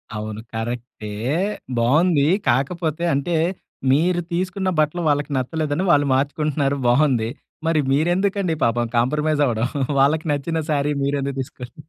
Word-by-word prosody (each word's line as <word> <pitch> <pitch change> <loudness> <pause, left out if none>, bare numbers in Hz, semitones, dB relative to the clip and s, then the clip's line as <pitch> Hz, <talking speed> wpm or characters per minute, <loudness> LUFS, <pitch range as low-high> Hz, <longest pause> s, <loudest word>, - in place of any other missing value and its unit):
అవును. 110 0 -5
కరెక్టే. 115 -1 -5 0.7
బావుందీ. 145 +5 +3 0.2
కాకపోతే 155 +6 0
అంటే, 140 +5 0 0.6
మీరు 175 +5 +2
తీసుకున్న 185 +2 -1
బట్టలు 155 +3 +1
వాళ్ళకి 145 0 0
నచ్చలేదని 150 +5 -1
వాళ్ళు 145 -2 +4
మార్చుకుంటున్నారు, 140 0 0
బావుంది. 120 -3 +3 0.4
మరి 165 -1 +2
మీరెందుకండి 180 +5 +1
పాపం 120 +1 +2
కాంప్రమైజ్ 150 +5 +1
అవడం! 115 -2 0 0.3
వాళ్ళకి 150 +4 +3
నచ్చిన 145 +3 -1
శారీ 145 0 +1
మీరెందుకు 140 -1 -1
తీసుకోడం! 125 -1 -9
145 Hz, 115 wpm, -21 LUFS, 130-160 Hz, 0.7 s, వాళ్ళు